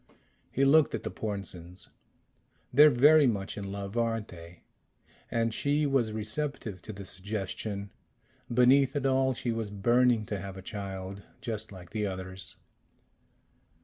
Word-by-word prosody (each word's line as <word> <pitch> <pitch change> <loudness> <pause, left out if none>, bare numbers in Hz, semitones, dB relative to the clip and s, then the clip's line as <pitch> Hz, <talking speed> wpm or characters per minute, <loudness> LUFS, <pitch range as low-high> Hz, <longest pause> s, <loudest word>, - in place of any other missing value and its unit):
He 135 - +2
looked 150 +2 +5
at - - -5
the - - -4
Pornsens. 90 -4 -5 0.8
"They're 150 +4 +9
very 145 +3 +6
much 100 -5 -2
in 100 -2 -5
love, 100 +1 -5
aren't 115 -2 0
they? 85 -1 -12 0.7
And 115 -1 0
she 145 +4 +1
was 135 -6 +2
receptive 110 -2 -3
to 110 - -7
the 100 -1 -8
suggestion 100 +1 -4 0.6
beneath 130 +3 +5
it 140 -2 -1
all, 130 -1 +2
she 120 - -2
was 115 -2 -3
burning 120 +3 +3
to 105 -1 -3
have 95 +1 -7
a 95 - -9
child, 95 -1 -6 0.2
just 110 -2 -4
like 90 -3 -11
the 105 -2 -1
others." 95 -2 -6
110 Hz, 145 wpm, -29 LUFS, 95-125 Hz, 0.8 s, They're